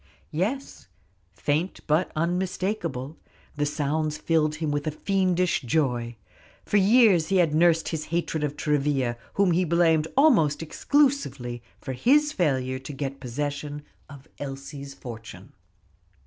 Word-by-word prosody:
Yes, 220 - -3 0.4
faint 155 +6 -1
but 155 +4 +1
unmistakable; 170 -4 -2 0.4
the 145 0 0
sounds 150 +1 -1
filled 155 -2 +1
him 155 -1 -2
with 145 +1 -2
a - - +3
fiendish 180 +1 +1
joy. 120 -4 0 0.5
For 210 - +2
years 200 -5 +5
he 195 - 0
had 165 -4 +3
nursed 165 0 +3
his 155 -2 -3
hatred 165 -2 -2
of 145 0 -2
Travilla, 140 -5 0 0.2
whom 200 -2 +3
he 175 +2 +2
blamed 165 -2 +3
almost 200 - +4
exclusively 155 - 0 0.2
for 130 - -5
his 295 - +3
failure 130 - 0
to 135 +2 -8
get 135 0 -4
possession 145 +3 -4 0.3
of 140 0 -13
Elsie's 140 0 -7
fortune. 115 -3 -10
155 Hz, 130 wpm, -26 LUFS, 140-180 Hz, 0.5 s, years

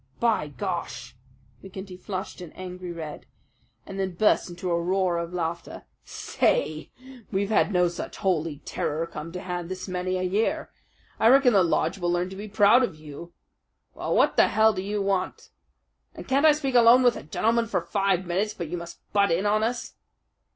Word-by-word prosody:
"By 225 -10 +1
Gar!" 175 +4 -3 0.8
McGinty 190 -1 -9
flushed 190 -2 -6
an 175 -3 -9
angry 180 -1 -7
red 160 -3 -7 0.6
and 195 0 -7
then 190 -2 -2
burst 210 0 +2
into 175 +1 -4
a 170 0 +1
roar 180 -1 +1
of 170 0 -4
laughter. 170 -1 -4 0.2
"Say, 155 +1 -1 0.4
we've 200 +1 -1
had 210 - +3
no 180 -2 +3
such 175 - -6
holy 160 -6 -1
terror 155 +3 -2
come 165 -1 -8
to 180 - -5
hand 175 -1 -4
this 185 +1 -6
many 185 0 -2
a 185 - -2
year. 200 +5 -1 0.5
I 220 - +4
reckon 260 0 +6
the 195 - +5
lodge 180 +3 +1
will 175 -1 0
learn 175 +1 -1
to - - -7
be 205 +2 -7
proud 215 +3 +5
of 245 -10 -1
you.... 155 +3 -11 0.6
Well, - - -2
what - - +3
the - - +6
hell 220 0 +4
do 185 - -3
you 205 +1 -2
want? 195 -2 -2 0.6
And - - -9
can't 275 +4 +4
I 305 - +7
speak 280 -3 -2
alone 240 +1 +7
with 245 -1 +4
a - - -6
gentleman 230 +10 0
for - - 0
five 195 -3 0
minutes 200 +5 -1
but 170 -6 -5
you 175 - -3
must 170 0 -9
butt 200 -1 +4
in 170 +4 +1
on 210 +1 +2
us?" 235 +2 -2
185 Hz, 190 wpm, -26 LUFS, 175-210 Hz, 0.8 s, I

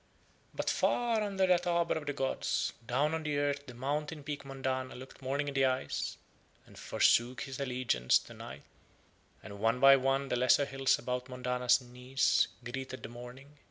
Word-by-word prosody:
But - - -3
far 235 -2 +2
under 195 -2 +1
that 180 -1 +2
arbour 170 -1 +2
of 155 -2 -5
the 145 - -1
gods 135 -1 -1
down 140 +7 0
on 160 - -1
the 150 -2 -2
earth 145 0 -1
the 125 - -9
mountain 150 +4 -3
peak 145 0 -5
Mondana 130 -1 -3
looked 130 +2 -11
Morning 140 +2 -1
in - - -6
the 135 0 +3
eyes 130 0 -1 0.5
and - - -17
forsook 120 +1 +2
his 135 0 -6
allegiance 125 - +2
to - - -10
Night, - - -10 0.8
and 100 0 -9
one 115 +3 +2
by 135 +1 +9
one 135 +1 0
the - - +1
lesser 130 +3 +4
hills 135 -1 +1
about 125 0 -4
Mondana's 125 0 +1
knees 125 +2 +1 0.2
greeted 130 +2 -6
the - - -6
Morning. 125 +5 -11
135 Hz, 175 wpm, -32 LUFS, 125-145 Hz, 0.8 s, by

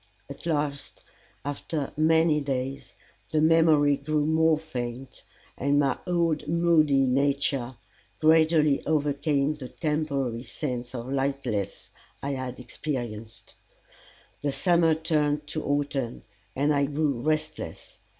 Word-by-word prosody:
At - - -8
last, 145 -3 -2 0.4
after 145 0 -4
many 160 0 +3
days, 135 -1 -4 0.4
the 155 - +1
memory 155 -3 +4
grew 150 +1 0
more 160 0 +3
faint, 130 -4 -6 0.3
and 140 +2 +1
my 140 -2 +2
old 170 -4 0
moody 155 -4 +3
nature 135 -1 0 0.4
gradually 155 -2 +4
overcame 145 -1 +1
the 135 -4 -9
temporary 140 -7 -2
sense 125 -2 -5
of 120 +2 -5
lightness 135 -8 -2 0.3
I 140 - -1
had 130 -2 -4
experienced. 115 -5 -6 0.9
The 145 - 0
summer 170 0 +3
turned 150 -2 0
to 155 - -3
autumn, 140 -4 -2 0.3
and 145 +3 +2
I 140 -1 +2
grew 145 -3 -1
restless. 155 - -3
145 Hz, 110 wpm, -27 LUFS, 135-155 Hz, 0.9 s, memory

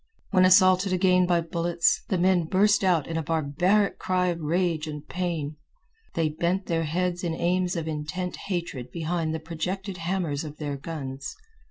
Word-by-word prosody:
When 185 -2 +5
assaulted 185 +1 +5
again 185 -1 +3
by 175 -1 +3
bullets, 170 +1 +1
the 190 - +1
men 180 -1 +3
burst 205 +5 +3
out 175 -6 +3
in 165 - -3
a - - 0
barbaric 165 +6 +1
cry 180 -1 +1
of 170 -1 -3
rage 165 0 0
and 150 -1 -7
pain. 165 -5 -3 0.6
They 165 -2 +1
bent 170 +5 -1
their 165 -1 0
heads 175 +3 -1
in 165 -2 -1
aims 180 +1 0
of 165 -2 -3
intent 155 +4 -3
hatred 170 -10 -3
behind 165 +2 -2
the 160 - -2
projected 180 +4 -4
hammers 165 -4 -2
of 150 -1 -8
their 145 -2 -3
guns. 140 -2 -6
170 Hz, 170 wpm, -26 LUFS, 155-185 Hz, 0.6 s, When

